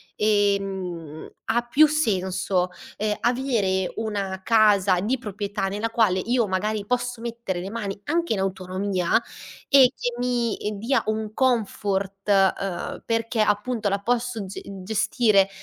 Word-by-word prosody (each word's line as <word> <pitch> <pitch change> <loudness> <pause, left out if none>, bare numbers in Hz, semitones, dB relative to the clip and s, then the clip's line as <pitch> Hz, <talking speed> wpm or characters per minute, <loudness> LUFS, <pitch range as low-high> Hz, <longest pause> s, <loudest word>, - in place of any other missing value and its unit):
ehm, 195 -6 -1
ha 235 +2 +1
più 305 +5 +6
senso, 190 -9 0 0.3
ehm, 210 0 -1
avere 230 -7 0
una 200 -4 -3
casa 205 -5 +4
di 245 +7 0
proprietà 205 -3 -3
nella 210 +4 -2
quale 220 -5 +2
io 235 +2 +1
magari 205 +2 -1
posso 250 0 -1
mettere 230 -6 -4
le 185 - -5
mani, 205 -3 -4
anche 335 0 0
in 210 - +1
autonomia, 190 +1 0 0.5
e 265 -2 +7
che 245 - -3
mi 245 -2 0 0.2
dia 240 +7 +1
un 215 0 -2
comfort, 200 -5 -1
ehm, 195 -2 +1
perché 230 0 0
appunto 215 +1 0
la 200 0 0
posso 235 -1 -1
ge 190 - -7 0.2
gestire 210 -1 +2
210 Hz, 130 wpm, -24 LUFS, 195-235 Hz, 0.5 s, e